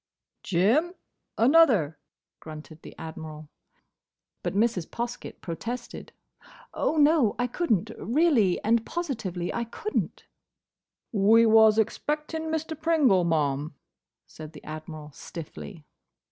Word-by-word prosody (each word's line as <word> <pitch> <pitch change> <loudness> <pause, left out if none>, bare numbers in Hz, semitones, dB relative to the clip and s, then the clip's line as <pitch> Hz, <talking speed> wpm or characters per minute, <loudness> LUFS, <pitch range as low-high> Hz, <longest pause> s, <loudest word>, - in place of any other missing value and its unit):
"Jim, 235 - +2 0.4
another," 230 - +4 0.4
grunted 155 0 -11
the - - -12
Admiral. 155 -1 -8 0.9
But - - -3
Mrs. 205 -5 +1
Poskett 240 0 -6
protested. 235 +8 -6 0.6
"Oh, 315 - 0
no, 295 -6 +4
I 245 - +1
could 295 +5 -2
n't! 215 +1 +1
Reely 240 - +2
and 225 +1 +2
posivitely 220 - -4
I 235 - -1
could 425 - -7
n't!" - - -2 0.9
"We 220 +2 +5
was 220 -1 +6
expecting 300 +8 -1
Mr. 320 0 -2
Pringle, 295 - +3
ma'am," 150 -2 0 0.5
said 155 0 -11
the 150 - -12
Admiral, 155 -1 -8
stiffly. 165 +2 -9
220 Hz, 110 wpm, -27 LUFS, -, 0.9 s, was